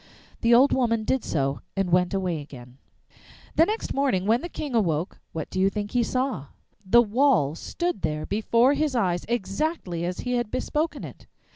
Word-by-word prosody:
The 235 0 +5
old 265 +4 +5
woman 230 -3 +1
did 260 +2 0
so 140 -2 -1
and 195 -2 -1
went 180 0 +3
away 185 -5 -1
again. 130 -3 -12 0.8
The 325 - +5
next 435 +2 -2
morning, 265 -10 +1
when 230 +4 +3
the 345 - -6
King 295 -5 -5
awoke, 175 -7 0
what 160 -2 -5
do 185 - -2
you 190 +1 +4
think 205 0 -4
he 245 - +2
saw? 255 - -1 0.4
The 235 +5 +5
wall 225 - +2
stood 345 - -3
there 155 0 -2
before 230 +5 +3
his 290 -2 0
eyes, 180 -7 0
exactly 195 - -2
as 180 +1 -3
he 250 - -3
had 240 -3 -2
bespoken 300 +6 -2
it! - - -10
215 Hz, 180 wpm, -25 LUFS, 175-260 Hz, 0.8 s, The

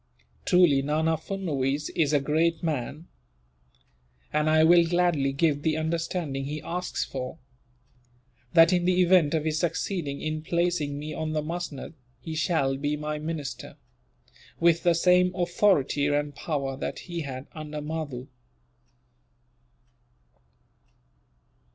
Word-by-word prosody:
Truly 175 -7 +5
Nana 155 +3 +1
Furnuwees 150 -5 -2
is 155 -4 +2
a 145 - +4
great 160 +4 +1
man, 150 +1 -3 1.3
and 150 +1 +2
I 155 0 +5
will 170 +1 +7
gladly 170 -5 +1
give 145 +1 +1
the 155 0 0
undertaking 160 -3 -2
he 150 +2 -4
asks 180 +2 -3
for; 130 +3 -6 1.2
that, 165 +2 +7
in 175 -1 +2
the 185 0 +2
event 175 -4 +4
of 155 -1 -1
his 155 -1 0
succeeding 165 -3 -2
in 155 0 -3
placing 170 -3 -1
me 150 +1 -5
on 155 -1 -3
the 155 -1 -1
musnud, 165 -2 -5 0.3
he 160 - -7
shall 155 -4 +1
be 145 +2 -1
my 150 0 -4
minister, 155 -2 -6 0.8
with 170 0 +4
the 175 -1 +3
same 180 +1 +3
authority 175 -5 +2
and 145 0 0
power 140 -2 -3
that 135 - -4
he 175 -2 -5
had 135 -2 -6
under 150 -1 -6
Mahdoo." 150 -4 -5
155 Hz, 125 wpm, -26 LUFS, 145-170 Hz, 1.3 s, will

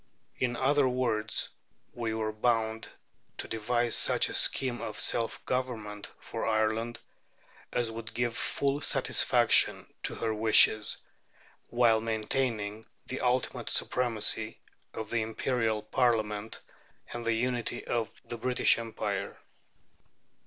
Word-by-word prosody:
In 125 -1 0
other 135 +1 +2
words, 115 -4 -1 0.4
we 115 -2 -3
were 110 -1 -2
bound 110 0 -1 0.5
to - - -6
devise 120 +2 0
such - - +3
a - - -6
scheme 125 -2 +2
of - - -5
self 115 -2 +1
government 110 -5 -4
for - - -6
Ireland 110 +1 0 0.7
as 120 -2 -1
would 115 0 -7
give 120 -1 -1
full 140 +3 -1
satisfaction - - +3
to - - -1
her 110 -1 -2
wishes, 110 0 +5 0.7
while 120 -2 +3
maintaining 110 -1 -2 0.2
the 130 - -5
ultimate 125 0 -1
supremacy 110 -2 0 0.3
of 110 -1 -7
the 115 - +1
Imperial 110 -1 -1
Parliament 110 -3 0 0.5
and 120 0 -5
the 115 0 +1
unity 120 +1 -2
of 115 -2 -3
the 120 - -6
British 125 0 +3
Empire. 105 -4 -4
115 Hz, 115 wpm, -29 LUFS, 110-120 Hz, 0.7 s, wishes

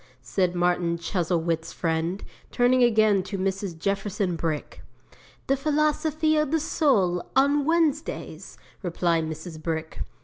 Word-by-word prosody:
said 175 +9 0
Martin 175 -1 +1
Chuzzlewit's 170 -2 -1
friend, 165 +3 -2 0.3
turning 250 +1 +3
again 215 -4 +4
to 195 +2 -5
Mrs. 190 -2 -2
Jefferson 195 0 -1
Brick. 160 -3 -4 0.6
'"The 275 - +2
Philosophy 305 +2 +1
of 305 -2 +1
the 320 +2 +1
Soul, 205 - +1
on 280 +2 +3
Wednesdays," 320 -2 -1 0.2
replied 170 -2 0
Mrs. 160 0 -7
Brick. 160 0 -4
190 Hz, 115 wpm, -25 LUFS, 170-275 Hz, 0.6 s, again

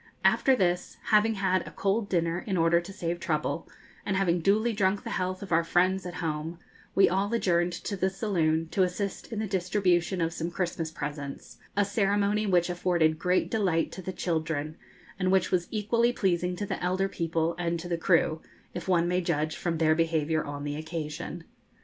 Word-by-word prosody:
After 265 - +5
this, 180 -5 0
having 215 +1 +4
had 190 -2 +1
a - - -8
cold 200 +2 -1
dinner, 170 -1 +1
in 190 -3 0
order 165 +1 +4
to 180 +3 -9
save 175 -3 -3
trouble, 160 0 -2 0.3
and 195 - -1
having 180 -3 +2
duly 215 +6 +2
drunk 200 -1 +1
the - - -5
health 185 +1 -2
of 190 - -9
our 165 0 +4
friends 180 +2 +2
at 175 - -7
home, 160 0 -3 0.4
we 195 - +6
all 195 +4 0
adjourned 175 -5 +2
to 200 +4 -4
the 190 0 +1
saloon, 165 -5 0
to 190 - 0
assist 185 +4 -2
in 225 - -4
the 215 - -1
distribution 185 -1 +1
of 165 -1 0
some 165 0 -3
Christmas 175 -2 -2
presents, 145 -3 -6 0.2
a 205 - +4
ceremony 205 +1 +1
which 175 -3 +3
afforded 175 -3 +1
great 180 +1 +1
delight 185 -7 +1
to 190 - -7
the 185 - -4
children, 160 -4 -2 0.4
and 185 -1 +1
which 190 -2 +2
was 175 -2 +1
equally 230 +2 +1
pleasing 180 -5 0
to 205 - -3
the - - -4
elder 185 +2 +1
people 165 -2 -1
and 170 -1 -1
to 175 - -6
the 175 - 0
crew, 165 -2 +2 0.3
if 175 - -6
one 175 -2 +3
may 180 +1 +1
judge 155 -3 -1
from 170 -2 -2
their 155 -1 +4
behaviour 160 -1 +1
on 145 0 -6
the 145 0 -3
occasion. 160 +1 -5
175 Hz, 190 wpm, -28 LUFS, 165-195 Hz, 0.4 s, we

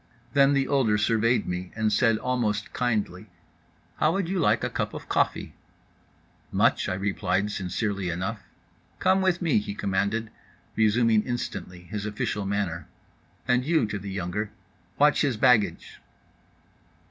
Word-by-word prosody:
Then 140 0 +5
the 135 -1 +1
older 125 -7 +2
surveyed 115 +3 +2
me 90 0 -4
and 110 -1 +1
said 115 +1 +3
almost 110 -4 -1
kindly: 110 -5 -1 0.7
"How 155 - +2
would 195 -3 -1
you 190 0 -1
like - - +2
a - - 0
cup - - -3
of - - -8
coffee?"—"Much," - - -2
I 90 - -1
replied 100 +1 -1
sincerely 100 0 -2
enough.—"Come 100 - -3
with 185 -1 +1
me," 155 -10 +3
he 100 -1 -6
commanded, 100 +3 -1 0.4
resuming 110 0 +3
instantly 105 -7 -5
his 105 +3 -5
official 105 -1 -2
manner. 100 -5 -2 0.6
"And 125 0 +3
you" 160 -2 +2
(to 105 -1 -4
the 100 +1 -7
younger) 95 +2 -3 0.5
"watch 150 +1 +4
his 135 -7 +1
baggage." 120 -3 +2
105 Hz, 135 wpm, -26 LUFS, 100-125 Hz, 0.7 s, Then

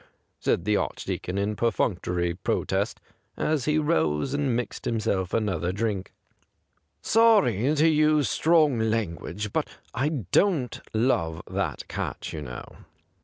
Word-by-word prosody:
said 85 - 0
the 105 - +2
Archdeacon 95 -1 -3
in 100 +2 0
perfunctory 90 -6 0
protest, 90 - -1 0.4
as 155 -4 0
he 150 0 +2
rose 135 - +1
and 140 -4 +1
mixed 120 0 -4
himself 100 -5 0
another 95 -6 0
drink. 100 -1 -2 0.5
' - - -47
Sorry 185 - +4
to 155 +2 +4
use 155 -2 +3
strong 155 -6 +3
language, 105 -2 -2
'but - - 0 0.3
I 130 +5 +1
don't 145 - +1
love 85 -9 0
that - - -3
cat, - - -4
you 75 - -5
know.' 60 -4 -8
115 Hz, 125 wpm, -26 LUFS, 95-150 Hz, 0.5 s, Sorry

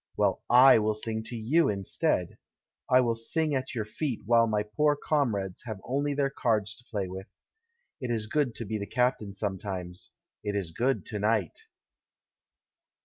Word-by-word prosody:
Well, - - +2
/ - - -55
will 120 -4 +7
sing 110 0 -3
to 120 - -6
you 130 +10 +2
in 100 -2 -2
stead. - - -1 0.5
I 130 0 +6
will 120 -2 +1
sing 150 +7 -1
at 130 -1 -2
your 110 -3 -1
feet, 130 +2 -3
while 115 +1 +5
my 105 -1 +1
poor 145 +8 +2
comrades 110 - -1
have 110 -4 -5
only 140 +3 -1
their 140 -1 +1
cards 110 -5 0
to 120 - -17
play 100 -5 -2
with. 95 +1 -8 0.7
It 125 - -4
is 115 -2 -1
good 130 +1 0
to 115 - -5
be 110 +1 -3
the 100 - -5
captain 125 -4 0
sometimes 95 -3 -4
— - - -65
it 105 -1 -2
is 95 -5 -2
good 130 +10 0
to 105 -3 -4
night." 105 -5 0
110 Hz, 180 wpm, -28 LUFS, 105-130 Hz, 0.7 s, will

